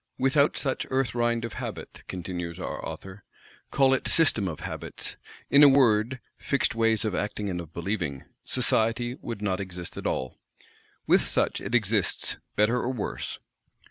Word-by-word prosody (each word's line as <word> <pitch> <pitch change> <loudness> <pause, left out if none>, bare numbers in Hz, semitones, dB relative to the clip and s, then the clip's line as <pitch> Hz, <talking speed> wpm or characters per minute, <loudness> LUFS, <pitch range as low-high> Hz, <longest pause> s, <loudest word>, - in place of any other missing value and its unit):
"Without 140 +3 +3
such 135 -2 -1
Earth 130 -1 0
rind 120 -1 +1
of 115 - -6
Habit," - - -7
continues 90 -2 -5
our - - -5
author, 95 0 -8 0.5
"call 135 -1 +4
it 135 - 0
System 115 -11 +4
of 80 -4 -5
Habits, - - -4 0.4
in 140 - +7
a 145 - +10
word, 125 -2 +3 0.2
fixed 140 -3 +1
ways 115 -1 +2
of 105 - -1
acting 105 +1 -2
and 90 -1 -3
of 80 -2 -11
believing,—Society 110 - -1
would 115 -3 -6
not 95 -2 0
exist 90 -3 -6
at - - -3
all. 65 -1 -3 0.7
With - - +5
such - - +1
it 110 +5 -2
exists, 105 -4 +1 0.2
better 105 +4 +3
or 125 +1 -1
worse. 120 -5 -4
110 Hz, 155 wpm, -27 LUFS, 95-125 Hz, 0.7 s, a